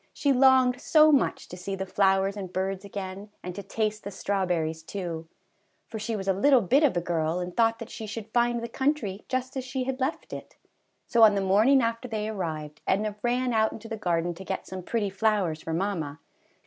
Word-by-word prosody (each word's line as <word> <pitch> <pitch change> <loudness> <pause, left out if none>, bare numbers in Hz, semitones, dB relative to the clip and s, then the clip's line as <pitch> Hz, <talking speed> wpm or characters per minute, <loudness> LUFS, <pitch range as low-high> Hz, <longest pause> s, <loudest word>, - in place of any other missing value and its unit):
She 280 -2 +2
longed 260 -1 +5
so 310 -1 +6
much 280 - +1
to - - -8
see 185 +2 -4
the 190 0 -4
flowers 195 0 +2
and 190 -3 -6
birds 190 +1 -2
again, 200 0 -6
and 180 - -5
to 200 - -6
taste 215 +2 -2
the 200 - -5
strawberries, 180 -5 -1
too; 165 -2 -5 0.6
for 220 0 -7
she 220 +2 -2
was 195 -2 -5
a 195 - +4
little 255 +6 +4
bit 255 +9 +3
of 280 - +3
a - - +1
girl 165 0 -1
and 180 0 -5
thought 225 -1 +3
that 230 -1 -9
she 220 - -6
should 220 +1 -7
find 240 -1 +2
the - - -3
country 235 -6 -1
just 255 +1 -2
as 265 - -2
she 255 +1 -3
had 260 0 -3
left 270 +4 -3
it. - - -9 0.5
So 235 - +2
on 215 -2 +8
the - - +1
morning 215 +8 +4
after 230 +2 -2
they 215 -2 -3
arrived, 155 -7 -4
Edna 205 +2 +1
ran 245 +1 0
out 220 -1 +2
into 225 0 -9
the 225 - -4
garden 175 -4 -1
to 180 +3 -10
get 190 0 -4
some 185 0 -6
pretty 205 +1 -1
flowers 195 -6 0
for 165 - -5
mamma. 165 -5 -2
205 Hz, 215 wpm, -27 LUFS, 185-235 Hz, 0.6 s, on